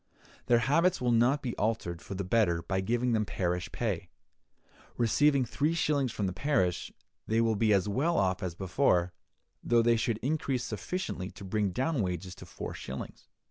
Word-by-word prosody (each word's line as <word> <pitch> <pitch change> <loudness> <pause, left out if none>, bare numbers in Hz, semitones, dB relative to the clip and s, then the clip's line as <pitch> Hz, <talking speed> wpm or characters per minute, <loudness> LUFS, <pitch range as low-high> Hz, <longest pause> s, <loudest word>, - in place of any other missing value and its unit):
Their 120 - +5
habits 165 +6 +3
will 125 -1 +1
not 120 +5 +3
be 120 -3 -3
altered 100 -6 -1
for 100 - -7
the 100 - -2
better 90 -4 +2
by 95 +2 -1
giving 120 +5 0
them 110 -2 +2
parish 90 -3 -2
pay. - - -2 0.9
Receiving 140 +3 +3
three 145 +8 0
shillings 145 -6 +1
from 105 - -2
the 90 - -1
parish, 95 -7 0 0.4
they 110 +1 +2
will 115 -1 +2
be 110 +1 +2
as 100 -1 +3
well 140 +11 +1
off 95 -1 +1
as 90 -3 -3
before, 90 -2 +1 0.5
though 120 -1 +3
they 115 0 +4
should 115 -1 0
increase 135 -3 -1
sufficiently 105 - -4
to - - -12
bring 105 +1 0
down 130 - 0
wages 90 -1 -3
to - - -11
four - - -6
shillings. 65 - -8
115 Hz, 180 wpm, -30 LUFS, 95-130 Hz, 0.9 s, Their